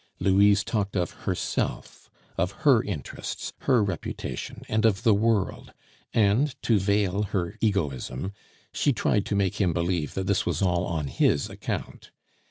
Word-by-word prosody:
Louise 100 +1 +4
talked 105 -3 -2
of 90 -2 0 0.2
herself, - - -3 0.3
of 90 +3 0
her 130 -6 +6
interests, 80 -10 -5
her 125 -5 +3
reputation, 95 -5 -5
and 110 0 0
of 110 -1 +2
the 110 - +5
world; 105 -1 0 0.4
and, 115 +6 +2
to 110 -3 +3
veil 100 0 +1
her 95 -4 -2
egoism, 95 - -1 0.4
she 145 - +2
tried 105 -2 +1
to 100 - -1
make 100 +1 0
him 90 -4 +2
believe 85 -3 -1
that 95 - -2
this 100 -1 +1
was - - -1
all 90 -2 +1
on 80 -3 -2
his 70 +1 +1
account. - - -5
100 Hz, 150 wpm, -26 LUFS, 90-105 Hz, 0.4 s, her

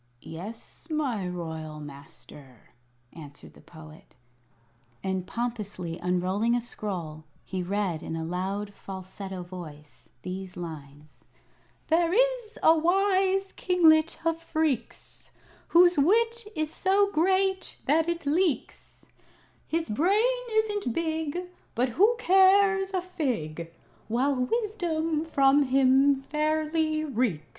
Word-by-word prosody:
"Yes, 205 - -9
my 265 - -1
royal 160 -3 -6
Master," 140 -3 -13 0.4
answered 145 -3 -12
the - - -17
Poet; 155 -1 -15 0.9
and, 190 -1 -2
pompously 205 -8 -4
unrolling 185 +6 0
a - - +2
scroll, 180 -9 -5 0.2
he 185 -1 -4
read 185 -3 -2
in 160 - -5
a 165 - -3
loud, 195 +4 -3
falsetto 190 -1 -8
voice, 155 -5 -11
these 185 0 -6
lines: 150 -3 -10 0.6
"There 335 +1 +2
is - - +1
a 320 - +7
wise 385 +3 +2
Kinglet 325 -3 +3
of 330 0 +1
Phreex, 310 -8 -3 0.4
Whose 350 -1 +5
wit 455 +8 +2
is 310 0 -2
so 400 +1 +2
great 380 +2 +1
that 320 +3 +2
it 340 -2 -3
leaks; 320 +1 -1 0.6
His 330 0 -1
brain 410 - +2
isn't 420 - 0
big, 320 +1 -2 0.3
But 245 +2 +1
who 415 - +3
cares 385 -1 +4
a 370 -2 -1
fig 215 - -3 0.4
While 255 +5 +1
wisdom 325 - -1
from 275 -2 +4
him 270 +1 +3
fairly 310 +1 0
reeks?" 230 - -1
275 Hz, 110 wpm, -27 LUFS, -, 0.9 s, a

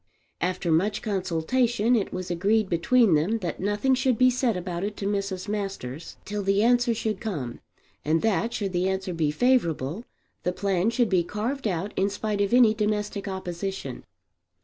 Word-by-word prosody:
After 180 0 -1
much 200 +6 +1
consultation 210 +5 +1
it 210 -4 0
was 185 -1 -4
agreed 200 +4 +1
between 200 +4 +3
them 165 +9 +2
that 170 -4 -3
nothing 205 +7 +1
should 260 -2 +2
be 255 0 +5
said 245 -4 0
about 175 0 -4
it 205 +1 -3
to 195 - -4
Mrs. 200 -2 -2
Masters 195 -9 -5
till 210 0 -3
the 195 +1 +2
answer 240 0 +3
should 220 -3 -2
come; 145 - -4 0.4
and 160 +3 +1
that, 225 +1 +1
should 200 -5 -3
the 180 +2 +1
answer 190 -1 -2
be 160 -3 0
favourable, 170 - +1 0.4
the 180 - -1
plan 195 +1 +1
should 235 -1 +1
be 185 -3 +3
carried 225 +8 -3
out 190 +1 -2
in 195 +1 +1
spite 205 0 -2
of 200 - +1
any 240 -3 +6
domestic 210 -1 -2
opposition. 190 -6 -5
200 Hz, 170 wpm, -26 LUFS, 180-225 Hz, 0.4 s, any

